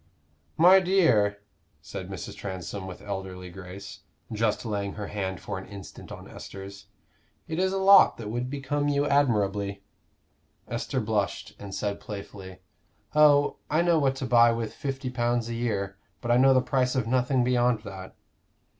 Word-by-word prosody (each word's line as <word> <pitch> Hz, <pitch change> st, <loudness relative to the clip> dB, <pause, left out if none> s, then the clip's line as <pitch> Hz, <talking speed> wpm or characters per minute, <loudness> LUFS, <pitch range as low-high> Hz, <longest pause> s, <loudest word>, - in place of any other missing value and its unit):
"My 180 Hz, +4 st, +8 dB
dear," 120 Hz, -, +2 dB, 0.4 s
said -, -, -8 dB
Mrs. -, -, -7 dB
Transome 95 Hz, 0 st, -6 dB
with 90 Hz, -, -9 dB
elderly 95 Hz, -2 st, -6 dB
grace, 95 Hz, +1 st, -9 dB, 0.3 s
just 110 Hz, 0 st, 0 dB
laying 100 Hz, -2 st, -2 dB
her 105 Hz, -2 st, -6 dB
hand 95 Hz, -3 st, -3 dB
for -, -, -5 dB
an -, -, -11 dB
instant 100 Hz, -2 st, -11 dB
on -, -, -9 dB
Esther's, 100 Hz, +1 st, -10 dB, 0.6 s
"it 160 Hz, +2 st, -3 dB
is 190 Hz, 0 st, +2 dB
a 195 Hz, -, -1 dB
lot 195 Hz, +1 st, +7 dB
that 110 Hz, -2 st, -6 dB
would 120 Hz, +2 st, -2 dB
become 145 Hz, +1 st, -2 dB
you 145 Hz, 0 st, +1 dB
admirably." 100 Hz, -8 st, +1 dB, 0.8 s
Esther 120 Hz, +2 st, -2 dB
blushed, 105 Hz, -2 st, -2 dB
and 100 Hz, -1 st, -7 dB
said 100 Hz, -1 st, -2 dB
playfully: 95 Hz, -2 st, -9 dB, 0.5 s
"Oh, 145 Hz, -1 st, +5 dB
I 155 Hz, +3 st, +2 dB
know 170 Hz, -2 st, +3 dB
what 135 Hz, -2 st, +1 dB
to 135 Hz, -, -4 dB
buy 120 Hz, -1 st, +6 dB
with 115 Hz, -1 st, -3 dB
fifty 135 Hz, -3 st, -4 dB
pounds 120 Hz, -1 st, 0 dB
a -, -, -3 dB
year, 100 Hz, -5 st, -2 dB, 0.2 s
but 120 Hz, -, -2 dB
I 120 Hz, -, +5 dB
know 135 Hz, +1 st, +6 dB
the 130 Hz, -, +5 dB
price 130 Hz, -1 st, +1 dB
of 130 Hz, -4 st, +1 dB
nothing 125 Hz, +2 st, +2 dB
beyond 120 Hz, -2 st, +2 dB
that." 95 Hz, -3 st, -9 dB
115 Hz, 165 wpm, -27 LUFS, 100-135 Hz, 0.8 s, My